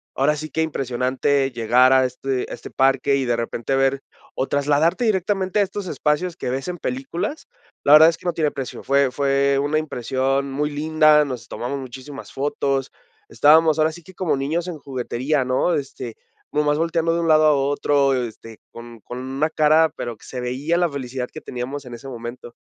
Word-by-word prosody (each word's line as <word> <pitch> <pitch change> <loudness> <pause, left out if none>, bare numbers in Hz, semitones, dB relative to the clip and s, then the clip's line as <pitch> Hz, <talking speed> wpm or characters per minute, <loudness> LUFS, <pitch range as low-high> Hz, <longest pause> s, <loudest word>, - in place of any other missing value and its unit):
ahora 145 +3 +2
sí 155 +1 -6
que 160 - 0
impresionante 135 -1 0
llegar 125 +2 +4
a 130 0 +5
este 130 +1 -3
a - - -6
este - - -11
parque 135 +1 +2
y, 135 - -1
de 120 -1 +1
repente, 115 +3 -2
ver 135 0 +1 0.3
o 135 - -1
trasladarte 150 - +1
directamente 190 -1 0
a - - +5
estos 200 +1 -5
espacios 165 +3 -1
que - - -4
ves 135 +4 -3
en 180 -1 -5
películas. 170 - -4 0.4
La 145 - +5
verdad 155 +2 +9
es 165 - -3
que - - -20
no 175 - 0
tiene 155 -2 +1
precio. 135 -3 -6
Fue 140 -1 +2
fue 140 0 +1
una 145 +2 0
impresión 135 -1 -1
muy 150 +2 -1
linda, 155 0 +4
nos 125 -5 -6
tomamos 125 +6 -4
muchísimas 130 +2 -9
fotos. 140 -1 -1 0.4
Estábamos 155 +1 +5
ahora 155 0 +2
sí 175 - -12
que 185 - -15
como 180 -5 0
niños 155 +6 -2
en 170 -4 -6
juguetería, 130 +1 -2
¿no? 130 +7 +1
Este, 130 -5 -5 0.4
nomás 150 0 +2
volteando 165 0 +1
de 170 - 0
un 170 - -1
lado 155 -1 +5
a 155 - +6
otro, 140 0 +2
este, 115 -2 -6
con 115 0 -11
con 120 +5 -8
una 135 +4 -1
cara, 155 +1 +4
pero 120 -1 -4
que - - -17
se 130 - -6
veía 130 +7 -1
la 175 -1 +2
felicidad 130 -3 -5
que 155 - -9
teníamos 130 +3 -5
en 125 - -9
ese 120 +3 -9
momento. 120 -1 -8
140 Hz, 195 wpm, -22 LUFS, 130-155 Hz, 0.4 s, verdad